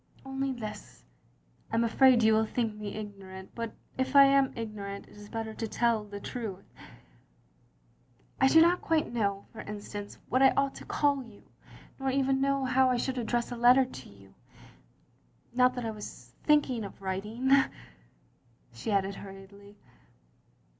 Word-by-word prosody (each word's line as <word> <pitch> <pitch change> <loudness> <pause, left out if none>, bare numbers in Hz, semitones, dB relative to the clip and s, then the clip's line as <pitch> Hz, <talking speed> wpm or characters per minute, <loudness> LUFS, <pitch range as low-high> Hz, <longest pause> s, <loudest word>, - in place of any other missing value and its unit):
" - - -26
"Only 270 0 -2
this: 215 -4 -8 0.7
I - - -1
am 230 - +3
afraid 240 +1 +5
you 220 0 +5
will 220 0 +2
think 230 -2 -1
me 210 -1 -6
ignorant, 195 -3 -9
but 230 -1 -5 0.2
if 260 +1 -1
I 275 0 +8
aw 275 -1 +5
ignorant, 205 -3 -6
it - - -17
is 205 0 -12
better 225 -1 -4
to 225 - -4
tell 230 -1 +1
the 205 -1 -8
truth. 200 -4 -6 1.7
I 265 - +5
do 320 +4 +7
not 350 +2 +3
quite 320 -6 0
know, 200 -4 -1
for 225 - -7
instance, 205 0 -7
what 255 +3 +1
I 270 - +6
ought 275 0 +2
to - - -10
call 285 -2 +1
you, 225 -5 -14 0.6
nor 270 0 -1
even 270 0 +1
know 275 -1 +1
how 260 0 +3
I 250 - +2
should 260 +1 -2
address 240 +1 -1
a - - -3
letter 245 +2 +6
to 130 - -11
you 100 -1 -18 0.6
— - - -34
^not 250 0 +4
that 245 -2 -4
I 225 - -2
was 205 - -10
thinking 285 -6 +3
of 200 - -9
writing 210 +7 -2 0.5
— - - -33
" 120 0 -35
she 120 - -6
added 200 -1 +1
hurriedly. 200 +1 -12
225 Hz, 175 wpm, -29 LUFS, 200-260 Hz, 1.7 s, I